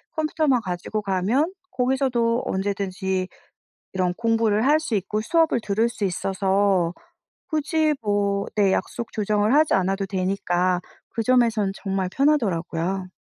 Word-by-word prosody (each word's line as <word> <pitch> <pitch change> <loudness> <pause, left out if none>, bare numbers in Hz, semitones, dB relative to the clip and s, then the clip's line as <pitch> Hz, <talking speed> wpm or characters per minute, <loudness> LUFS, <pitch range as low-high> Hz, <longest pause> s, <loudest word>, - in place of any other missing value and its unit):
컴퓨터만 305 -5 +1
가지고 185 +3 -3
가면 210 - 0 0.2
거기서도 250 -2 +1
언제든지 190 -1 -2 0.7
이런 180 -1 0
공부를 225 -1 +1
할 300 +3 +5
수 280 -8 -3
있고 210 +2 -1
수업을 320 0 +2
들을 220 +3 +1
수 225 -3 -4
있어서 190 -1 +1 0.6
굳이 310 0 +1
뭐 200 -1 0
네 200 -2 +3
약속 235 - -3
조정을 210 +2 +1
하지 310 0 +4
않아도 195 +1 +1
되니까 185 -2 0 0.3
그 225 - -3
점에선 230 -5 +2
정말 195 -2 -2
편하더라고요. 190 - 0
205 Hz, 290 characters per minute, -23 LUFS, 190-245 Hz, 0.7 s, 할